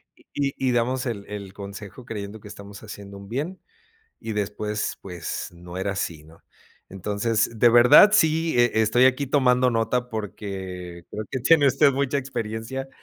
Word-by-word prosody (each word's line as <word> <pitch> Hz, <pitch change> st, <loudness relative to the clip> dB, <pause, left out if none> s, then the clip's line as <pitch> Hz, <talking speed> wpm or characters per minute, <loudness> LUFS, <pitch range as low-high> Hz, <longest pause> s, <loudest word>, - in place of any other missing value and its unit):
Y -, -, -24 dB
y 140 Hz, -1 st, 0 dB, 0.2 s
y -, -, +2 dB
damos 125 Hz, +2 st, 0 dB
el 105 Hz, -5 st, -4 dB
el 100 Hz, -2 st, -7 dB
consejo 100 Hz, +4 st, -9 dB
creyendo 105 Hz, -1 st, -6 dB
que 105 Hz, -, -13 dB
estamos 100 Hz, 0 st, -11 dB
haciendo 100 Hz, -1 st, -10 dB
un 100 Hz, 0 st, -12 dB
bien, 150 Hz, +10 st, -4 dB, 0.6 s
y 115 Hz, -, -5 dB
después, 105 Hz, 0 st, -3 dB
pues, 90 Hz, -3 st, -5 dB
no 85 Hz, +1 st, -11 dB
era 95 Hz, +1 st, -1 dB
así, 85 Hz, -5 st, -4 dB
¿no? 80 Hz, +1 st, -18 dB, 0.5 s
Entonces, 105 Hz, +4 st, -1 dB
de 120 Hz, -, +6 dB
verdad, 120 Hz, -, +8 dB
sí 160 Hz, -5 st, +3 dB
e 120 Hz, 0 st, +4 dB
e -, -, +5 dB
estoy 120 Hz, +3 st, +4 dB
aquí 130 Hz, +2 st, +1 dB
tomando 125 Hz, -2 st, +3 dB
nota, 120 Hz, +2 st, 0 dB
porque 95 Hz, -5 st, -6 dB
creo 105 Hz, +1 st, -5 dB
que 130 Hz, -, -3 dB
tiene 145 Hz, +3 st, +5 dB
usted 140 Hz, +2 st, +4 dB
mucha 140 Hz, +1 st, 0 dB
experiencia. 120 Hz, 0 st, -5 dB
110 Hz, 170 wpm, -24 LUFS, 100-130 Hz, 0.6 s, verdad